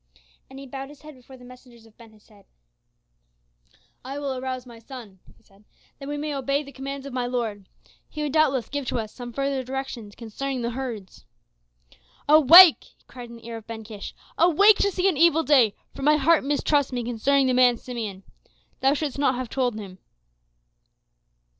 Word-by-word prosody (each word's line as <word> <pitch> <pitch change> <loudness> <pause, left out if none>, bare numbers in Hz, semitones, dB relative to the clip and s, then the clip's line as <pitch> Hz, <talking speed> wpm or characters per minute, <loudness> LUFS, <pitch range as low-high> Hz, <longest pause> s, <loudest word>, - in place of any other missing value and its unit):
And 265 - -12
he 275 - -9
bowed 270 +1 -8
his 295 0 -16
head 305 0 -11
before 260 0 -16
the 250 - -15
messengers 245 -2 -16
of 220 -1 -22
Ben 230 -2 -17
Hesed. 210 -1 -22 1.6
"I 270 +2 -7
will 280 -2 -3
arouse 255 0 -5
my 235 -2 -13
son," 225 -5 -12 0.2
he - - -28
said, 195 +1 -25 0.4
"that 275 0 -8
we 290 - -3
may 300 0 -4
obey 275 +1 -1
the 280 - -12
commands 275 0 -7
of 275 - -8
my 250 -1 -2
lord. 225 -6 -4 0.4
He 300 - -5
would 290 -2 -3
doubtless 275 -6 +2
give 285 -2 -5
to - - -2
us 220 -2 -5
some 245 -1 -8
further 275 +1 -2
directions 255 -5 -6
concerning 250 +3 -5
the 235 - -2
herds." 230 - -7 1.0
"Awake!" 315 +4 +8
he - - -33
cried 245 -2 -11
in 235 - -11
the 230 -1 -15
ear 230 -1 -6
of 220 - -13
Ben 225 -1 -7
Kish. 210 -2 -9 0.2
"Awake 385 +5 +5
to 400 - +2
see 375 -1 0
an 360 -7 +1
evil 325 0 +4
day, 260 -9 +3 0.2
for - - -10
my 300 +2 +4
heart 320 +2 +3
mistrusts 285 0 0
me 245 -1 -3
concerning 265 +4 +1
the 255 - +1
man 250 -1 +4
Simeon. 220 -7 -7 0.6
Thou 270 +2 +2
shouldst 285 -2 -4
not 270 -3 +2
have 250 -1 -5
told 250 -4 -1
him." 190 -3 -10
260 Hz, 190 wpm, -24 LUFS, 235-280 Hz, 1.6 s, Awake